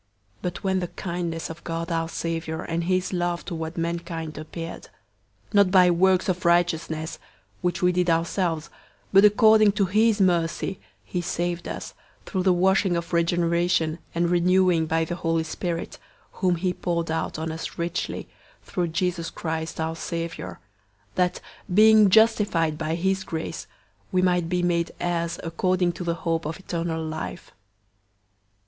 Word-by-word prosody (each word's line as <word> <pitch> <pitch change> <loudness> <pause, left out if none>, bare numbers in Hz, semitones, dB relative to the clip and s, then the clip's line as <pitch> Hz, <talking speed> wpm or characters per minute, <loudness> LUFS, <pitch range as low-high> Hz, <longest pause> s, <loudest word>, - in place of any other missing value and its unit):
003:004 - - -34
But 180 +2 -4
when 190 -1 +1
the 175 - -2
kindness 170 -2 -4
of 165 +1 -11
God 165 +1 -4
our 165 0 -1
Savior 165 -1 -3
and 165 0 -2
his 185 +1 0
love 175 -1 -1
toward 160 -1 -5
mankind 170 -1 -3
appeared, 165 +2 -7 0.6
003:005 - - -22
not 200 -2 +5
by 180 -1 +6
works 185 +1 +3
of 185 -1 -1
righteousness, 165 -2 +1 0.4
which 180 0 -1
we 180 - +5
did 180 0 +1
ourselves, 165 -1 0 0.4
but 195 +1 +7
according 215 0 +6
to 200 -1 +2
his 215 +3 +3
mercy, 175 0 +1 0.3
he 180 - -3
saved 175 0 -2
us, - - -6 0.3
through 190 - -2
the 185 0 +4
washing 190 0 +3
of 170 +1 -5
regeneration 170 -1 +1 0.2
and 170 0 +1
renewing 180 -1 +3
by 165 +1 +1
the 175 +1 -4
Holy 165 -2 0
Spirit, 170 +2 -4 0.3
003:006 - - -23
whom 185 -2 +2
he 180 +1 -1
poured 170 -2 -2
out 160 - -2
on 160 +1 -3
us 160 +1 -6
richly, 170 +2 -3 0.4
through 175 -2 -2
Jesus 170 0 -1
Christ 160 -1 -4
our 160 0 -1
Savior; 165 0 -5 0.5
003:007 - - -33
that, 180 -1 +1 0.3
being 215 +1 +7
justified 200 -7 +3
by 155 +1 -2
his 190 +2 0
grace, 160 -3 -5 0.4
we 185 -2 +2
might 180 -2 +2
be 180 0 0
made 170 -1 +1
heirs 170 -1 -1
according 180 +2 +1
to 170 +1 -7
the 170 -1 -1
hope 165 -1 -2
of 160 - -4
eternal 165 -3 -3
life. 155 0 -6
175 Hz, 160 wpm, -25 LUFS, 165-185 Hz, 0.6 s, but